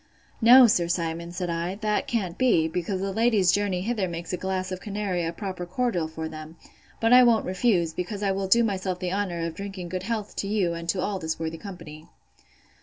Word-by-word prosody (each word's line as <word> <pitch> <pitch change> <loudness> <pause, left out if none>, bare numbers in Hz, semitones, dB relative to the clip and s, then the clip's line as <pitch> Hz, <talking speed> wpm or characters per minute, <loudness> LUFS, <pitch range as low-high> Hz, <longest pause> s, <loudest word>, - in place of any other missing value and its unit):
No, 245 +3 +9
Sir 175 -7 +2
Simon, 170 0 -2
said 180 -1 -3
I, 170 +3 -2
that 210 0 -1
can't 190 -7 -2
be, 195 -10 +3
because 180 +3 -3
the 195 0 -2
ladies' 220 -4 +3
journey 200 -3 0
hither 210 -2 -1
makes 170 +1 -6
a - - +2
glass 185 0 -3
of 185 - -4
canary 200 -4 -2
a 165 - -1
proper 185 0 -5
cordial 185 -4 -1
for 160 0 -5
them: 155 0 -9 0.4
but 225 +1 +3
I 250 - +9
won't 235 -3 +4
refuse; 185 -4 +1
because 200 +4 -4
I 195 - +2
will 195 0 -2
do 235 +5 +5
myself 190 -4 -1
the 180 0 -3
honour 180 -4 -2
of 165 - -4
drinking 190 -1 -7
good 185 +1 -3
health 215 +1 -4
to 200 - -2
you, 200 -5 0
and 170 0 -6
to 180 +1 0
all 200 0 -2
this 160 -2 -3
worthy 165 0 -4
company. 160 -5 -10
185 Hz, 215 wpm, -26 LUFS, 170-205 Hz, 0.4 s, No